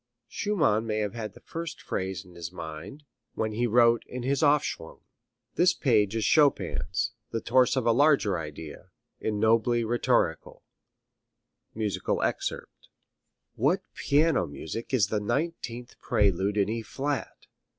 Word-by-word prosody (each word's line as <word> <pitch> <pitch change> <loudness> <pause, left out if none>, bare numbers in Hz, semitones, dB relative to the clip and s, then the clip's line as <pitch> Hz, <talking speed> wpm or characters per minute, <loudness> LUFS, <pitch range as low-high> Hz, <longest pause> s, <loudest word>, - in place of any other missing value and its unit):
Schumann 150 - +1
may 110 -1 -1
have 105 -1 -1
had 110 -3 -6
the - - -13
first 165 -1 -6
phrase 95 -2 -4
in 90 - -16
his 85 -1 -7
mind 80 - -8 0.3
when 110 -1 -1
he 120 +3 0
wrote 115 0 +4
his 130 +3 -2
Aufschwung. 145 - +1 0.5
This 175 +1 +3
page 110 -6 +2
of 110 - 0
Chopin's, 115 - +2 0.2
the 115 - -2
torso 130 +2 +3
of - - -8
a 120 - +5
larger 135 -6 +3
idea, 75 -1 -8 0.3
is - - -1
nobly 115 +3 +2
rhetorical. 120 +2 0 1.1
[Musical 105 -3 -1
score - - 0
excerpt] - - -4 0.7
What 160 - +1
piano 155 +3 +2
music 80 +10 -7
is 110 -7 +2
the 105 - 0
nineteenth 120 0 -3
prelude 100 +1 +1
in 100 - +3
E 115 +2 -2
flat! 140 +6 -4
115 Hz, 140 wpm, -27 LUFS, 105-135 Hz, 1.1 s, a